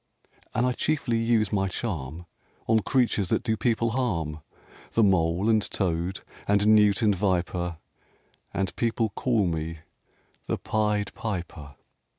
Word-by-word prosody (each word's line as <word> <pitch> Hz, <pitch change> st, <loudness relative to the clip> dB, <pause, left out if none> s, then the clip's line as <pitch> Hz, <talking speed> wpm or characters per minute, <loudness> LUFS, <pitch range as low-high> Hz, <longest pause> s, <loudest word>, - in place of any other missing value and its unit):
And 120 Hz, -, +2 dB
I 125 Hz, -, +2 dB
chiefly 130 Hz, -3 st, 0 dB
use 115 Hz, -2 st, +2 dB
my 95 Hz, -1 st, +2 dB
charm 85 Hz, -, -4 dB, 0.4 s
On 110 Hz, 0 st, +4 dB
creatures 110 Hz, -5 st, +1 dB
that -, -, +1 dB
do 110 Hz, -2 st, +1 dB
people 115 Hz, +1 st, +1 dB
harm, 85 Hz, -12 st, -1 dB, 0.5 s
The 115 Hz, -, +4 dB
mole 90 Hz, 0 st, +2 dB
and 110 Hz, -1 st, +4 dB
toad 90 Hz, -1 st, -1 dB, 0.3 s
and 100 Hz, 0 st, +3 dB
newt 105 Hz, 0 st, +5 dB
and 105 Hz, -2 st, +4 dB
viper; 90 Hz, -3 st, -1 dB, 0.7 s
And 95 Hz, -1 st, -2 dB
people 115 Hz, -1 st, 0 dB
call 110 Hz, 0 st, +1 dB
me 80 Hz, -1 st, -2 dB, 0.7 s
the -, -, 0 dB
Pied 105 Hz, -2 st, -1 dB
Piper." 85 Hz, -9 st, -5 dB
100 Hz, 135 wpm, -26 LUFS, 90-115 Hz, 0.7 s, newt